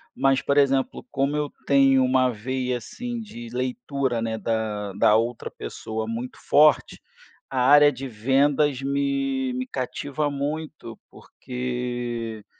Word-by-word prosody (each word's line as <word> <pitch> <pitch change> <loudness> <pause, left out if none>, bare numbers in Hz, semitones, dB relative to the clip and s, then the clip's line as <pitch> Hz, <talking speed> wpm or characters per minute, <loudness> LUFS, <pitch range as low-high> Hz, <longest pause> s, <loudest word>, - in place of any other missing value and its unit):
mas 135 0 +2
por 140 - 0
exemplo, 135 - +2
como 140 +2 0
eu 150 -1 -2 0.2
tenho 135 -2 +5
uma 130 0 +3
veia 125 +3 -2
assim 240 - -6
de 120 - -9
leitura, 125 0 -2
né, 110 -1 -2
da 105 -2 -2
da 105 +2 +4
outra 115 +1 -2
pessoa 110 - -5
muito 120 +3 -5
forte, 150 0 +4 0.5
a 130 - -2
área 145 +3 +7
de 135 +1 -6
vendas 135 +4 +1
me 135 -1 -1
me 130 0 -3
cativa 145 +3 -3
muito, 145 -4 -5
porque 120 -3 -5
130 Hz, 130 wpm, -24 LUFS, 120-140 Hz, 0.5 s, área